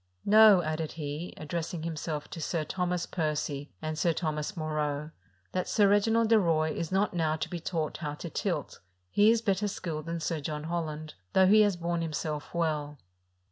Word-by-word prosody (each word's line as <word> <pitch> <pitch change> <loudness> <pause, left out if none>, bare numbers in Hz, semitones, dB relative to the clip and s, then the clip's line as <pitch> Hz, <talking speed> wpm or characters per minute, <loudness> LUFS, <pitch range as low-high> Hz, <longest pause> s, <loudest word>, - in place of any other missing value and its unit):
" 90 - -39
Know," 210 -3 +7
added 155 0 -2
he, 150 +2 -5
addressing 160 +1 -4
himself 155 -2 -4
to 165 - -6
Sir 160 +1 -1
Thomas 180 +2 -1
Percy 150 -3 -2
and 155 0 -3
Sir 170 0 +3
Thomas 155 +3 -3
Moreaux, 150 -1 -2 0.2
" 90 -1 -39
that 185 - -1
Sir 205 -3 +4
Reginald 220 +3 +3
de 225 -1 +6
Roye 160 -4 +2
is 165 0 -4
not 195 +2 +1
now 160 -3 +1
to 160 - -3
be 175 - -5
taught 165 -2 -2
how 150 -3 -4
to 170 - -7
tilt: - - -2 0.3
he 210 +1 +5
is 230 0 +3
better 200 0 +1
skilled 165 -5 -4
than 170 0 -2
Sir 165 0 -2
John 150 +1 -4
Holland, 155 -2 -4 0.2
though 190 - +6
he 215 +3 +7
has 205 -3 +3
borne 170 0 -2
himself 155 -2 -3
well." 150 -3 -1
165 Hz, 190 wpm, -29 LUFS, 155-180 Hz, 0.3 s, Know